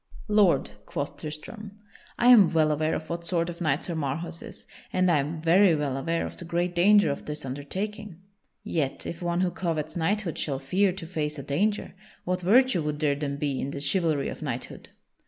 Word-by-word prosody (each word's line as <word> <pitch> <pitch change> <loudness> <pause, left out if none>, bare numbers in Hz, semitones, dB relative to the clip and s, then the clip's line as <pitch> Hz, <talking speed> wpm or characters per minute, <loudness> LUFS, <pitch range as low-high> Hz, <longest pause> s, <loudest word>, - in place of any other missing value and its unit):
"Lord," 210 -4 +3 0.2
quoth 145 -2 -4
Tristram, 160 +8 -8 0.4
"I 245 - +4
am 215 -8 +8
well 155 -2 +3
aware 155 +1 0
of 155 - -5
what 170 0 -4
sort 170 0 0
of 170 - -12
knight 150 -3 +1
Sir 175 - -4
Marhaus 165 +3 -3
is, - - -11 0.3
and 185 -1 +2
I 155 - +4
am 150 +4 -3
very 175 +1 +5
well 145 -3 -1
aware 165 +5 -1
of - - -8
the - - -7
great 175 +1 -1
danger 190 -1 +5
of 140 - -6
this 150 -2 -4
undertaking. 190 - -5 0.5
Yet 145 -5 -2
if 170 - -6
one 175 0 0
who 185 -1 +1
covets 160 -4 -3
knighthood 180 +1 -1
shall 140 -3 -1
fear 185 +9 +1
to 180 -2 -7
face 155 -3 -3
a 140 - -6
danger, 195 +10 -1 0.3
what 180 0 -1
virtue 235 +1 +4
would 150 -1 -2
there 150 -2 +2
then 140 -1 -3
be 140 -2 -1
in 135 - -3
the 140 - -5
chivalry 150 0 +1
of - - -8
knighthood? - - -5
165 Hz, 200 wpm, -27 LUFS, 150-185 Hz, 0.5 s, am